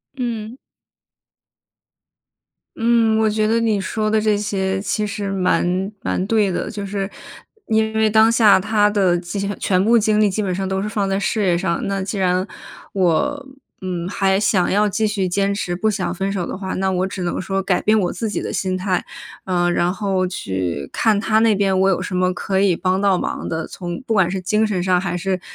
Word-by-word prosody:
嗯。 235 -2 -4 2.2
嗯， 230 -1 +3
我 220 0 +3
觉 215 0 +1
得 230 +1 +2
你 215 -3 +1
说 215 +2 -2
的 215 0 +2
这 210 -1 +2
些 195 -2 -1
其 210 0 -1
实 200 -1 -4
蛮 185 0 0
蛮 185 - -1
对 210 -3 +2
的。 - - -3
就 205 -2 -5
是 195 0 -3 0.6
因 220 0 +2
为 220 0 +3
当 220 +1 +5
下 220 -4 +5
他 210 +1 +2
的 195 -4 +2
精 195 +3 -4
全 185 -1 +1
部 235 +2 +4
精 215 0 +2
力 210 - +4
基 205 +2 -2
本 185 - -1
上 190 +1 -3
都 190 - -1
是 205 - -2
放 200 -2 -1
在 195 +1 0
事 215 +2 -1
业 175 -2 +2
上。 170 -2 -1
那 195 -1 -2
既 195 +1 -4
然 185 +1 +1 0.5
我， 265 - 0 0.3
嗯， 180 -2 -3
还 195 0 +1
想 200 -3 +2
要 210 +2 +3
继 215 +2 0
续 200 -3 -1
坚 195 +2 0
持， 175 -3 -2
不 215 +5 0
想 190 -5 -2
分 195 +2 -2
手 185 -4 -2
的 - - -5
话， 190 -1 -4
那 190 0 0
我 185 +1 0
只 190 -2 -5
能 175 - -2
说 195 +1 -2
改 185 -1 +1
变 215 0 +3
我 180 - -1
自 225 - -3
己 - - -3
的 - - -4
心 185 -1 -1
态， 185 -1 -1 0.4
呃， 175 -2 +1
然 175 0 +1
后 190 -2 -1
去 95 - -3
看 215 -3 +2
他 220 0 +2
那 220 -2 +4
边 195 -1 +1
我 190 +1 +4
有 190 - +1
什 185 - -4
么 185 0 +2
可 190 +1 -2
以 195 -3 +3
帮 185 +2 0
到 195 -2 +3
忙 - - -4
的， 160 0 -3
从 175 -2 -6
不 230 - -2
管 190 -5 +3
是 190 +1 -2
精 210 +4 +1
神 185 -4 -1
上 180 -1 +2
还 180 -1 -2
是 185 +1 -2
195 Hz, 230 characters per minute, -20 LUFS, 185-215 Hz, 2.2 s, 当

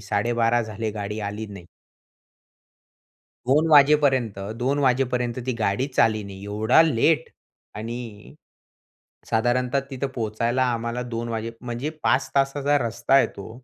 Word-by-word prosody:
12:30 115 +4 +1
झाले 110 0 -4
गाडी 105 0 -5
आली 105 +2 -4
नाही. 100 -4 -11 1.8
2:00 150 +5 +3
वाजेपर्यंत 140 -7 +4 0.2
2:00 140 +3 +1
वाजेपर्यंत 125 -2 0
ती 130 - 0
गाडीच 125 +6 -1
आली 110 -1 -2
नाही 95 0 -10
एवढा 105 +8 +3
लेट 150 +4 +2 0.5
आणि 115 +2 -5 1.3
साधारणतः 125 +4 +1
तिथं 135 +1 -3
पोहचायला 115 +3 0
आम्हाला 115 +1 -3
2:00 115 +1 -3
वाजे 115 +1 -4
म्हणजे 125 +4 -4
5 - - +2
तासाचा 140 +1 +2
रस्ता 115 +4 -1
आहे 135 - +6
तो 100 - -8
120 Hz, 125 wpm, -24 LUFS, 110-135 Hz, 1.8 s, आहे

